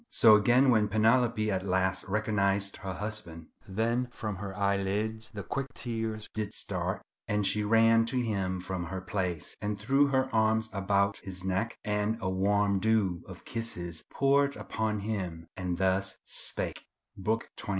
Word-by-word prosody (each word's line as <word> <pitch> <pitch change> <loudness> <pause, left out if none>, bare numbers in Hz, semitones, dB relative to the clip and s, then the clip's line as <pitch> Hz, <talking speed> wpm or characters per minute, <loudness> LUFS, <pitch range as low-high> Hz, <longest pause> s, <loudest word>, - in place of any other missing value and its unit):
So 110 -2 +7
again 125 +5 +5
when 110 -3 +4
Penelope 110 +1 +3
at 95 -1 -1
last 95 0 0
recognized 100 -1 +1
her 95 -1 -5
husband:— 95 -6 -5 0.2
"Then 115 +5 0
from 105 -4 -5
her 100 0 -6
eyelids 100 +3 0
the 100 -2 -6
quick 135 +9 -3
tears 110 -2 -4
did 110 -2 -3
start - - -2 0.2
And 105 -1 +1
she 105 +2 +1
ran 115 +1 +5
to 130 +3 -2
him 95 -6 -1
from 90 -1 -4
her 95 +3 -4
place, 90 -3 -2
and 105 0 -2
threw 135 +7 +3
Her 130 -1 +2
arms 110 0 +2
about 100 0 +1
his 95 -1 -7
neck, 95 +4 -1
and 105 +1 0
a 95 -4 -1
warm 100 +1 +2
dew 100 -4 +1
Of - - -11
kisses 90 -8 -4
poured 140 +1 +3
upon 110 -2 -2
him, 95 -6 -3
and 90 -2 -2
thus 95 +1 +1
spake:" - - -1 0.3
—Book 110 +4 -2
xxiii. - - -7
105 Hz, 160 wpm, -30 LUFS, 95-110 Hz, 0.3 s, So